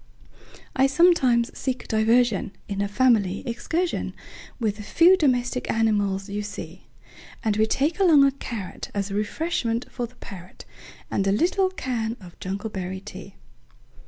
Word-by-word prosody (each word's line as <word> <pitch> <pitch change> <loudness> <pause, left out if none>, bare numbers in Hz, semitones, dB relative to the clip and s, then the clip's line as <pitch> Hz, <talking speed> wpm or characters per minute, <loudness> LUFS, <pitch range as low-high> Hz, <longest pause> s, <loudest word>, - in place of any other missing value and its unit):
I 265 0 +4
sometimes 270 -7 +3
seek 255 -2 -3
diversionIn 220 -2 +2 0.3
a - - -1
family 205 -4 +2
excursionWith 330 +9 -2 0.5
the 215 -3 -1
few 340 - +5
domestic 250 -6 0
animals 205 -3 +1
you 205 +1 -3
see; 190 -3 -8 0.6
And 215 -2 +1
we 220 +1 +2
take 295 - 0
along 325 -7 +6
a 275 - +5
carrotAs 205 -5 -5
refreshment 230 +2 -1
for 245 -2 -3
the 250 - -23
parrot, 185 -6 -11 0.5
And 195 - 0
a - - +3
little 370 - +2
can 240 -9 -3
of 180 -4 -14
jungleberry 190 -1 -5
tea. 190 +1 -10
225 Hz, 130 wpm, -24 LUFS, 200-265 Hz, 0.6 s, along